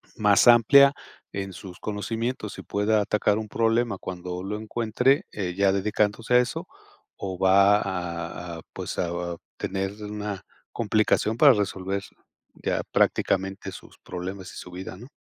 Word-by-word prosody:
más 105 +1 +4
amplia 135 +4 +7 0.4
en 95 -1 -4
sus 90 -1 -10
conocimientos 110 +1 -3
y - - -8
pueda 105 +1 +1
atacar 105 0 +1
un 110 - -6
problema 115 -1 +1
cuando 90 -1 -6
lo 105 +2 -3
encuentre, 120 - +1
eh, 95 -4 -3
ya 100 +1 +3
dedicándose 105 +4 +1
a - - +8
eso, 125 -1 -2 0.5
o 95 -2 -5
va 100 +2 +5
a 85 -2 -4
a, - - -10
pues, - - -5
a - - +1
a 85 0 -3 0.2
tener 95 0 -2
una 105 -1 -5 0.3
complicación 110 0 +1
para 140 +3 +8
resolver 100 -2 -2 0.6
ya - - 0
prácticamente 95 +1 +1
sus - - -13
problemas 95 +1 -6
y - - -10
su 90 - -9
vida, 95 +1 -7
¿no? 120 +7 -12
100 Hz, 150 wpm, -25 LUFS, 95-110 Hz, 0.6 s, a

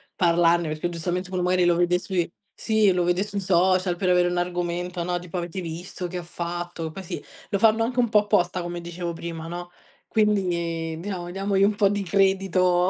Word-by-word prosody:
parlarne 170 -1 +3
perché 155 +3 -2
giustamente 175 +2 -3
uno 185 - -1
magari 180 0 +3
lo 175 -1 +4
vede 175 +1 +2
sui 180 -3 -1 0.3
sì, 220 -2 +3
lo 180 - +1
vede 175 +2 +2
sui 205 -1 -4
social 185 -1 +2
per 185 0 0
avere 180 0 +4
un 175 - -2
argomento, 175 0 -2
no, 175 0 -1
tipo: 180 0 -6
"Avete 175 +2 -4
visto 175 +2 -5
che 180 +1 -5
ha 175 - -5
fatto." 170 -1 -5
Poi 190 +4 -8
sì, 170 - -6 0.3
lo 200 - 0
fanno 225 +1 +4
anche 245 +2 -1
un 240 - +3
po' 210 -1 +5
apposta, 180 -3 +1
come 175 0 -5
dicevo 170 0 -5
prima, 165 -1 -6
no, 175 +1 -6 0.4
quindi 170 -6 0
diamo 180 -2 -5
diamogli 195 +1 +1
un 205 +1 +3
po' 200 -1 +4
di 205 0 -1
credito. 185 -2 +2
180 Hz, 200 wpm, -25 LUFS, 175-195 Hz, 0.4 s, po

